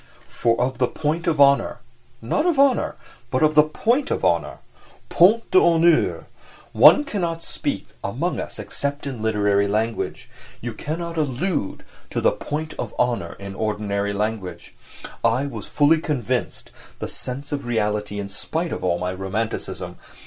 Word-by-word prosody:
For 115 0 +1
of 125 0 -1
the 125 - +3
point 160 +5 -2
of 155 -3 +1
honour—not 140 - +1
of 340 -5 +2
honour, 275 -2 +3 0.3
but 130 +4 +1
of 155 0 +4
the 150 - +8
point 230 - 0
of - - -1
honour - - +1 0.5
(point 210 +7 +4
d'honneur)—one 170 - +4
cannot 170 - -3
speak - - -3 0.2
among - - -2
us - - -6
except 140 +1 -4
in 130 -5 -5
literary 105 -2 +2
language. 110 +3 -2 0.3
You - - -5
can't 155 +3 -4 0.2
allude 150 - -2 0.2
to - - -2
the - - +3
"point 155 +1 -4
of - - -4
honour" 115 -9 0
in 100 0 -7
ordinary 100 -1 -1
language. 100 -3 -4 0.5
I 115 +4 +2
was 140 - -6
fully 155 +2 +3
convinced 130 -6 -2 0.3
(the - - -4
sense 135 +3 -6
of 140 -4 -3
reality, 105 -3 -1
in 100 - -4
spite 160 - -3
of - - -4
all 90 -1 +1
my 90 +1 -2
romanticism!) 95 +4 -4
130 Hz, 145 wpm, -23 LUFS, 105-160 Hz, 0.5 s, the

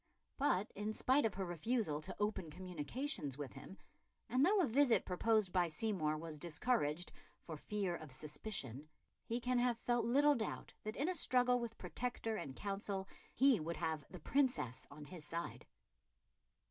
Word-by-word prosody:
But, 210 -8 +2
in 210 +2 -2
spite 260 +2 +4
of 210 - -7
her 190 0 -2
refusal 175 -2 0
to - - -6
open 205 -5 0
communications 180 - -3
with 145 -3 -5
him, 145 +8 -10 0.5
and 255 +2 +3
though 405 +6 +5
a 360 - +5
visit 265 0 +4
proposed 210 +1 +2
by 180 -2 +4
Seymour 155 -3 0
was 155 -1 -6
discouraged 170 -1 0 0.3
"for 160 - -7
fear 195 +2 -2
of 155 -3 -10
suspicion," 150 - -4 0.4
he 235 +2 -1
can 250 0 +1
have 245 -1 +2
felt 240 +1 +1
little 285 +5 +5
doubt 225 -6 -3
that 215 +1 -3
in 290 - 0
a 370 - +1
struggle 250 -6 +4
with 235 -1 -5
Protector 245 -3 -3
and 135 -10 -5
Council 195 -1 -3 0.3
he 265 -3 +6
would 165 +2 -3
have 160 -3 -1
the 180 - -8
Princess 170 - +1
on 145 +1 -10
his 170 0 -9
side. 170 +3 -5
195 Hz, 165 wpm, -38 LUFS, 155-245 Hz, 0.5 s, he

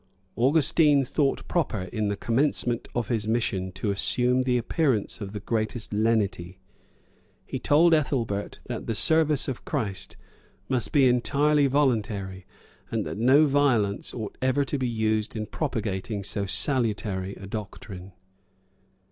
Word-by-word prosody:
Augustine 145 +2 +4
thought 140 +2 0
proper, 145 - -1
in 110 -2 0
the 100 - -1
commencement 120 0 0
of 120 -3 -1
his 110 -3 -1
mission, 100 -5 -1
to 100 +3 -2
assume 125 +5 +1
the 125 -1 +1
appearance 120 - 0
of 100 -1 -5
the 105 - -5
greatest 110 +1 -3
lenity; 105 -5 0 0.9
he - - -5
told 165 +3 +4
Ethelbert, 120 -9 -1
that - - -6
the 115 - -1
service 155 +4 +3
of 130 -4 -4
Christ 100 -3 -4 0.5
must 125 -4 -1
be 140 -3 +5
entirely 140 +4 +3
voluntary, 105 -9 0 0.4
and - - -2
that - - -5
no 135 +6 +5
violence 130 -8 +1
ought 110 -4 -7
ever 130 +2 +2
to 140 +2 -2
be 130 -2 0
used 110 -1 -1
in 110 -1 -3
propagating 105 - -3
so 100 +1 -2
salutary 105 -6 -1
a 95 - -10
doctrine. 100 -2 -7
115 Hz, 140 wpm, -26 LUFS, 105-135 Hz, 0.9 s, be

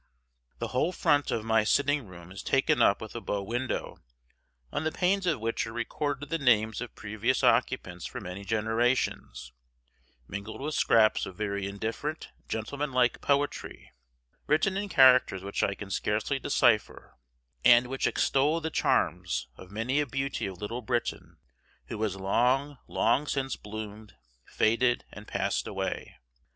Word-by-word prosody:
The - - -4
whole 150 +7 +1
front 145 -5 +2
of 110 - -2
my 110 -1 +3
sitting 140 +2 +1
room 90 -1 -12
is 100 - -7
taken 135 +3 +2
up 100 - +4
with 110 - -8
a 120 - -5
bow 100 -2 -2
window, 120 +5 -3 0.7
on - - -2
the 155 - 0
panes 190 +2 +1
of 160 -7 +1
which 115 +1 -2
are - - -6
recorded 145 +4 -3
the 165 - -1
names 110 -5 +2
of 125 - -7
previous 105 0 -1
occupants 90 0 +1
for 125 - -7
many 100 -2 -7
generations, 110 - -1 0.7
mingled 100 +3 -6
with 150 +3 -3
scraps 110 -5 +3
of 95 - -9
very 100 -2 -2
indifferent 115 +10 -4 0.2
gentleman 140 +6 -3
like 125 -1 +2
poetry, 145 0 -1 0.6
written 155 +6 +2
in 200 +1 -2
characters 130 - +5
which 100 0 -3
I 100 - +1
can 100 -1 -8
scarcely 110 +8 -1
decipher, 120 -6 +1 0.5
and 120 +1 +7
which 135 +2 -1
extol 145 +5 +2
the 160 0 -4
charms 60 - 0
of 90 - -13
many 115 +8 -1
a 150 - 0
beauty 135 -4 -2
of 95 -2 -8
Little 115 +4 -4
Britain 120 +1 -3 0.5
who 110 - -5
has 105 -3 0
long, 125 +8 +1
long 125 +7 +1
since 135 -2 -1
bloomed, 105 0 -8 0.3
faded, 120 +2 +2
and 105 0 -11
passed - - -1
away. - - -4
120 Hz, 155 wpm, -28 LUFS, 105-140 Hz, 0.7 s, and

